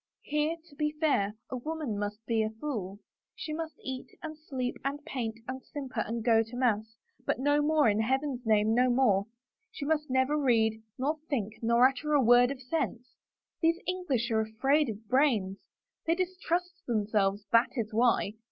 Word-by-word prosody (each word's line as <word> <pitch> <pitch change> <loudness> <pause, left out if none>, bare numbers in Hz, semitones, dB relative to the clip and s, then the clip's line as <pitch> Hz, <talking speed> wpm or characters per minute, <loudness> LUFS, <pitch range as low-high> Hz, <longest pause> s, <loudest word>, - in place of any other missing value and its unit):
" - - -64
Here, 300 +2 0
to 290 - -18
be 300 0 -1
fair, 210 -10 +2 0.2
a 255 - -2
woman 305 -3 -3
must 205 +2 -4
be 225 -1 +1
a 215 - 0
fool. 220 -5 -5 0.4
She 310 - -5
must 320 0 -4
eat 260 -1 -5 0.2
and 315 -1 -5
sleep 265 -5 -4
and 285 +2 -3
paint 230 -4 -4
and 260 +1 -5
simper 270 -5 -6
and 225 +1 -2
go 225 -2 +5
to 225 +2 -7
mass 225 -3 0
— - - -45
but - - +1
no 290 +3 +2
more, 300 -2 +3
in 210 0 +2
Heaven's 265 +2 0
name, 215 -1 +3
no 250 +2 +4
more 235 -6 +3
I - - -35 0.4
She 280 - -5
must 300 -1 0
never 260 +3 +2
read 220 -5 +2 0.2
nor 295 +4 -1
think 220 -7 -2
nor 235 +2 +5
utter 275 +3 -3
a 290 - +5
word 245 0 +6
of 270 -1 -6
sense. 250 -3 -2 0.5
These 330 0 +3
English 285 -11 -1
are 220 -1 +3
afraid 270 +7 +1
of 220 0 -7
brains. 225 -7 +2 0.5
They 330 - +3
distrust 365 0 -2
them 220 -4 +1
selves, 205 -1 +1
that 230 +1 +5
is 225 -3 -3
why. 230 -3 +2
250 Hz, 190 wpm, -30 LUFS, 220-295 Hz, 0.5 s, word